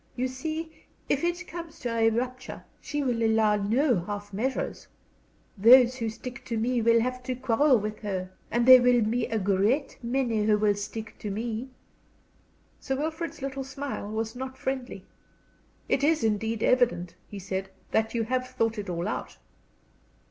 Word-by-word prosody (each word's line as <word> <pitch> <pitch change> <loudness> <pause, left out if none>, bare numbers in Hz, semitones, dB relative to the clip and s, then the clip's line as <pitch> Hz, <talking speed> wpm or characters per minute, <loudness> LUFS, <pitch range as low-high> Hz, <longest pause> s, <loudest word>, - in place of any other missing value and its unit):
You 255 +1 0
see, 315 +5 -6 0.2
if 285 - +1
it 345 +2 -1
comes 335 -1 -8
to 235 -2 -2
a 225 0 +4
rupture 255 +3 -4 0.2
she 295 -1 -3
will 245 -3 0
allow 220 -1 +3
no 230 - +2
half 205 +3 -6
measures. 255 +7 -3 0.7
Those 245 +4 +7
who 230 -3 -2
stick 240 +2 -8
to 230 - -3
me 240 +2 +1
will 230 +1 +5
have 255 +1 -2
to 255 0 -3
quarrel 260 +2 +3
with 215 0 -4
her. 185 -3 -4 0.2
And 235 +1 +1
there 255 -1 +10
will 245 -1 +4
be 230 +3 0
a 225 - -1
great 205 +8 +1
many 235 -3 0
who 210 0 +3
will 210 -1 +3
stick 215 +2 -7
to 210 - -5
me." 225 +4 -3 1.1
Sir 270 - -2
Wilfrid's 315 0 -4
little 270 0 -3
smile 270 -5 -5
was 220 +1 -3
not 260 +1 -6
friendly. 265 -2 -4 0.8
"It 275 - +1
is 310 -3 +3
indeed 220 +1 0
evident," 240 -9 +2
he 205 - -9
said, 190 0 -4 0.2
"that 220 +1 +1
you 230 - +1
have 255 +2 -1
thought 225 -3 -1
it 200 -2 -5
all 175 +1 -2
out." - - -4
235 Hz, 170 wpm, -27 LUFS, 215-260 Hz, 1.1 s, there